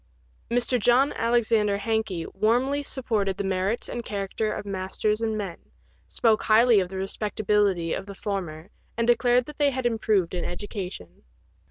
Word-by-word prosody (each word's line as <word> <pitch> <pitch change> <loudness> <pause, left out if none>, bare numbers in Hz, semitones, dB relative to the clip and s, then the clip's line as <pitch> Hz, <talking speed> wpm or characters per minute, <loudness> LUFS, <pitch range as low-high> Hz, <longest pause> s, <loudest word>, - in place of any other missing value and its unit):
Mr. 245 +1 +1
John 245 +6 +3
Alexander 225 -3 +2
Hankey 205 -5 -1
warmly 255 +6 +1
supported 220 -9 -2
the - - -2
merits 190 +4 -1
and 240 - -5
character 205 +1 -2
of - - -5
masters 200 +2 -2
and 220 -1 -1
men, 195 -5 -5 0.5
spoke 225 -2 +2
highly 225 0 +5
of 185 -2 -1
the 190 - -6
respectability 195 -3 0
of 195 - -4
the 200 - -8
former, 185 -3 -5 0.3
and 230 - +1
declared 240 +1 +3
they 290 0 +1
had 260 -2 -3
improved 215 -6 +1
in 175 - -2
education. 180 - -6
215 Hz, 150 wpm, -25 LUFS, 195-235 Hz, 0.5 s, highly